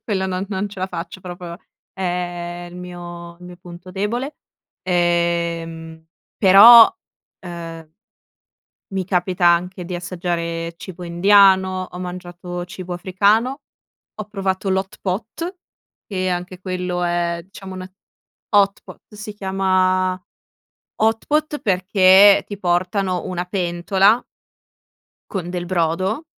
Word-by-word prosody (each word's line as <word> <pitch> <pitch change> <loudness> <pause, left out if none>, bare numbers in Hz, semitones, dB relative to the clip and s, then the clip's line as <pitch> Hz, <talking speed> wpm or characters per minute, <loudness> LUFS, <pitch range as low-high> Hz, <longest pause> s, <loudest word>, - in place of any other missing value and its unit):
quello 190 -3 -1
non 185 0 -2
non 195 +1 -2
ce 200 -1 -10
la 185 - 0
faccio 180 0 -7
proprio, 175 -1 -8 0.4
è 175 -1 -4
il 175 - -11
mio 175 -1 -9
il 180 - -14
mio 180 0 -11
punto 175 0 -12
debole, 235 +9 -3 0.5
ehm, 170 -2 -1 0.3
però, 225 - +9 0.5
ehm, 165 -3 -8 1.0
mi 190 -1 -2
capita 180 0 0
anche 175 +1 +2
di 180 - -6
assaggiare 170 -2 -3
cibo 180 0 -9
indiano, 190 +1 +4
ho 180 - -8
mangiato 175 -1 -6
cibo 180 0 -7
africano, 205 +9 +1 0.5
ho 215 - -5
provato 195 -2 -2
l' 190 - +2
hot 190 0 -4
pot, 230 - -4 0.5
che 185 -2 -2
anche 180 0 -4
quello 180 -1 -3
è, 175 -1 -1
diciamo 190 0 -10
una 185 0 -8 0.6
hot 200 -1 +3
pot, - - -13
si 210 0 -7
chiama 185 -2 +1 0.9
hot 225 0 +1
pot 300 0 0
perché 190 +1 +5
ti 205 - -6
portano 185 0 0
una 180 -1 -3
pentola 190 +4 +2 1.1
con 180 -3 -4
del 175 -1 -4
brodo 185 - -1
185 Hz, 120 wpm, -20 LUFS, 175-195 Hz, 1.1 s, però